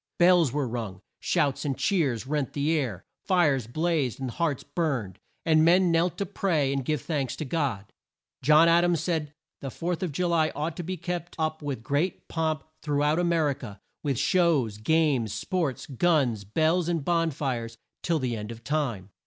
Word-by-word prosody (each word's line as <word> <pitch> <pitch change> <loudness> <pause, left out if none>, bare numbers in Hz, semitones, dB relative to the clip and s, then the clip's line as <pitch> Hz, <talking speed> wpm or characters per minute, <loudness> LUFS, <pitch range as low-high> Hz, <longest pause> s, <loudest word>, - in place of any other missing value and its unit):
Bells 175 -5 +5
were 145 -1 -1
rung. 110 -6 -5 0.2
Shouts 145 -6 0
and 140 -3 -2
cheers 145 - +1
rent 145 -1 -2
the 145 +2 0
air. 120 - -2 0.2
Fires 150 - +2
blazed, 155 -2 0
and 130 -2 -3
hearts 155 -1 -1
burned, 140 - -2 0.3
and 155 -1 +4
men 175 +2 +5
knelt 165 +1 +1
to 200 - -1
pray, 165 -8 0
and 135 -1 -1
give 150 -1 -1
thanks 140 -6 -2
to 155 - -5
God. 130 - -2 0.5
John 155 +5 +6
Ad 170 +1 +5
ams 175 -2 +2
said 160 -2 -2 0.3
the 135 - -5
Fourth 175 +6 -3
of 180 -4 -2
Ju 180 +6 -1
ly 165 -2 +2
ought 155 +2 -2
to 175 - -4
be 185 +2 -4
kept 175 0 -5
up 155 -1 -1
with 140 -6 -4
great 145 +9 -1
pomp 160 -3 -1 0.2
through 145 -1 0
out 150 +3 +2
A - - +1
mer 165 -3 +2
i - - +1
ca, 105 -6 -10 0.2
"with 140 -4 -1
shows, 145 - +2
games, 140 -4 +2
sports, 170 -9 -2
guns, 135 - +1
bells, 160 - +1
and 165 -5 -1
bon 165 -1 +2
fires" 125 -6 -3 0.2
till 170 -2 +1
the 125 -5 -1
end 105 0 -6
of 115 0 -10
time. 120 -11 -2
150 Hz, 190 wpm, -27 LUFS, 130-170 Hz, 0.5 s, John